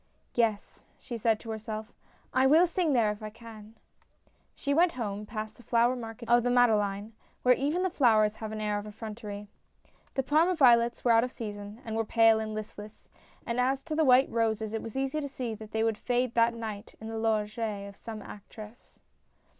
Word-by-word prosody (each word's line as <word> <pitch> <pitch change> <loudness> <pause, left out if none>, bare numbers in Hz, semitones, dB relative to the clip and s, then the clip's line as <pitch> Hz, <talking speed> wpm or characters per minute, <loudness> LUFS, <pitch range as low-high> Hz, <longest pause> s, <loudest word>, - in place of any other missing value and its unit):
" - - -42
Yes," 225 -4 -1
she 240 - -7
said 225 -1 +1
to 225 - -6
herself, 220 0 -6 0.2
" - - -34
I - - +6
will 320 +6 +6
sing 345 -3 0
there 225 -4 +3
if 210 +1 -8
I 215 - -5
can." 220 -1 -13 0.8
She 280 - -1
went 340 +3 +4
home, 210 -4 -4
past 215 -1 -6
the - - -14
flower 235 +2 +2
market 230 -1 -8
of 240 +1 +5
the 245 - 0
Made 245 -1 +5
leine, 205 +1 -1 0.3
where 250 - +6
even 295 +8 0
the 375 - +1
flowers 220 -8 +3
have 220 -1 -6
an 215 - -5
air 210 -1 0
of 205 - -8
effrontery. 210 -1 -7 0.7
The 270 - +1
Parma 320 +7 +3
violets 240 -5 +4
were 240 - +5
out 225 0 +5
of 250 - -3
season, 205 0 -7
and 220 -1 -4
were 225 - +1
pale 225 0 +4
and 215 -1 -4
listless, 210 0 -9 0.4
and 235 +1 -2
as 265 +2 +1
to 325 - -5
the 320 - +3
white 260 -1 +5
roses 220 -1 0
it 225 - -2
was 225 +2 -7
easy 270 +3 -1
to 285 - -4
see 250 -4 -4
that 215 0 -9
they 220 0 -1
would 225 -1 0
fade 245 -1 0
that 235 0 +3
night 220 -2 -7
in 220 - -8
the 225 0 -4
loge 215 -1 0
of 200 -3 -4
some 220 -1 -8
actress. 215 +3 -12
225 Hz, 210 wpm, -29 LUFS, 215-245 Hz, 0.8 s, I